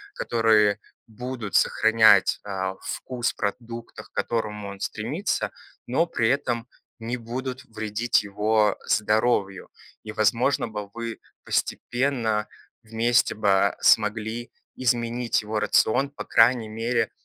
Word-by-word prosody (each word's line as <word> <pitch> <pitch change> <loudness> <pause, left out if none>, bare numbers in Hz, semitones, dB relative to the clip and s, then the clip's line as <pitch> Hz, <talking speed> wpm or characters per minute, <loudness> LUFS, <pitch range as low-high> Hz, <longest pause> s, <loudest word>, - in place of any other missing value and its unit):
которые 110 -3 +3 0.3
будут 120 -2 -6
сохранять, 110 -3 +5
а, 95 -2 -3
вкус 125 -2 -3
в - - -39
продуктах, 115 +2 -6
к - - -71
которому 105 -3 -2
он 100 0 -9
стремится, 135 - -2 0.4
но 145 +7 +2
при 115 -9 0
этом 120 -4 -1 0.3
не 115 +2 -3
будут 125 +2 -5
вредить 110 0 0
его 105 +1 +1
здоровью. 105 -3 +1 0.3
И 110 - -6
возможно 115 +5 +1
бы 105 -2 -6
вы 115 -1 -5 0.2
постепенно, 120 -5 -1 0.4
вместе 115 +2 +2
бы, 100 -1 +2
смогли 110 +2 +2 0.2
изменить 120 -1 0
его 105 0 -2
рацион. 110 +6 +2
По - - -8
крайней 115 -1 +4
мере, 115 +3 -1
115 Hz, 115 wpm, -25 LUFS, 105-120 Hz, 0.4 s, сохранять